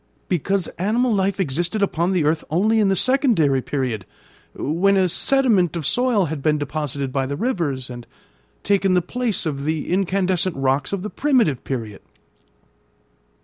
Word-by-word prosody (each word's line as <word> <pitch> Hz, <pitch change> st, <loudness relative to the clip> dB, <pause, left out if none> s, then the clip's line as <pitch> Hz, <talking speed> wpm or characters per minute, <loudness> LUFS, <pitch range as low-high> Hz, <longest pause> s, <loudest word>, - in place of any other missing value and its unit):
"Because 190 Hz, +2 st, 0 dB
animal 230 Hz, +6 st, +1 dB
life 195 Hz, -1 st, 0 dB
existed 175 Hz, +5 st, -1 dB
upon 175 Hz, -1 st, 0 dB
the 180 Hz, -4 st, +1 dB
earth 155 Hz, +1 st, +1 dB
only 215 Hz, +8 st, +2 dB
in 205 Hz, -2 st, +3 dB
the 195 Hz, -, +2 dB
secondary 210 Hz, -, +2 dB
period, 125 Hz, -8 st, -3 dB, 0.5 s
when 190 Hz, +7 st, +1 dB
a 190 Hz, -1 st, +3 dB
sediment 205 Hz, -, +2 dB
of 165 Hz, -4 st, -3 dB
soil 245 Hz, -, +2 dB
had 155 Hz, -2 st, -4 dB
been 150 Hz, +1 st, +2 dB
deposited 145 Hz, -2 st, -3 dB
by 135 Hz, -1 st, 0 dB
the 140 Hz, -, -3 dB
rivers, 155 Hz, -, -2 dB
and 120 Hz, -1 st, -9 dB, 0.6 s
taken 195 Hz, -2 st, +2 dB
the 180 Hz, -, +2 dB
place 240 Hz, 0 st, -2 dB
of 140 Hz, -3 st, -3 dB
the 155 Hz, 0 st, -2 dB
incandescent 185 Hz, -1 st, 0 dB
rocks 135 Hz, +1 st, 0 dB
of 200 Hz, -2 st, -3 dB
the 210 Hz, -, -5 dB
primitive 250 Hz, -, +1 dB
period." 115 Hz, -6 st, -5 dB
175 Hz, 155 wpm, -21 LUFS, 145-200 Hz, 0.6 s, in